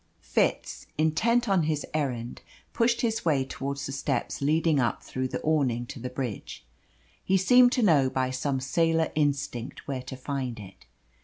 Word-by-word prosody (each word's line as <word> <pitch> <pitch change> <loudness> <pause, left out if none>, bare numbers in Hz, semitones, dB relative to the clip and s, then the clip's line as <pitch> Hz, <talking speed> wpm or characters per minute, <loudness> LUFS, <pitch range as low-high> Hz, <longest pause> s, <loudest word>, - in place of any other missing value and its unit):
Fitz, - - -1
intent 225 +11 +2
on 195 -3 +3
his 155 -1 -1
errand, 125 -6 -3 0.3
pushed 235 0 +2
his 225 -1 0
way 145 -5 +2
towards 140 +1 -4
the - - -4
steps 135 -1 -2
leading 155 +1 +2
up 120 -2 0
through 130 0 -3
the - - -4
awning 135 -6 +1
to 120 - -9
the 125 +2 -5
bridge. 125 - -5 0.6
He 190 - +3
seemed 245 +6 +6
to 250 - +1
know 145 -9 +4
by 130 0 -1
some 135 +1 -1
sailor 165 +4 +1
instinct 140 -5 -2
where 135 -2 -3
to 130 +1 -8
find 130 -3 -4
it. 95 -10 -13
140 Hz, 165 wpm, -27 LUFS, 130-165 Hz, 0.6 s, seemed